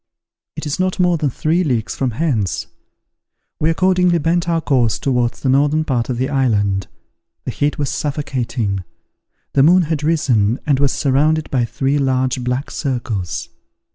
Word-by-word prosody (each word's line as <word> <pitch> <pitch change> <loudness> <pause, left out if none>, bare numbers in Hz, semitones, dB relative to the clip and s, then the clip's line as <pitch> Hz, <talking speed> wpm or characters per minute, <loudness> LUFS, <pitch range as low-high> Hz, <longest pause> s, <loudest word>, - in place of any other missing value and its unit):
It - - -6
is 150 +3 -3
not 185 0 0
more 180 -1 +3
than 150 -2 0
three 160 +7 0
leagues 115 - -1
from 130 - 0
hence." 110 - 0 0.9
We 155 - +2
accordingly 180 0 +3
bent 170 +2 0
our 165 -1 +2
course 125 -8 +1
towards 125 -3 -1
the 135 - 0
northern 145 +3 +3
part 125 -5 -1
of 125 - -1
the 130 +2 0
island. 105 -9 +1 0.6
The - - -2
heat 145 +1 -1
was 145 -2 -1
suffocating. 125 -9 -2 0.7
The 140 - +4
moon 175 +5 +5
had 155 -2 -2
risen, 130 -8 +1
and 140 -3 +2
was 140 -2 +2
surrounded 150 +3 +1
by 125 -3 +1
three 135 +4 0
large 130 -1 0
black 125 +3 -2
circles. 120 - -3
140 Hz, 160 wpm, -18 LUFS, 125-155 Hz, 0.9 s, moon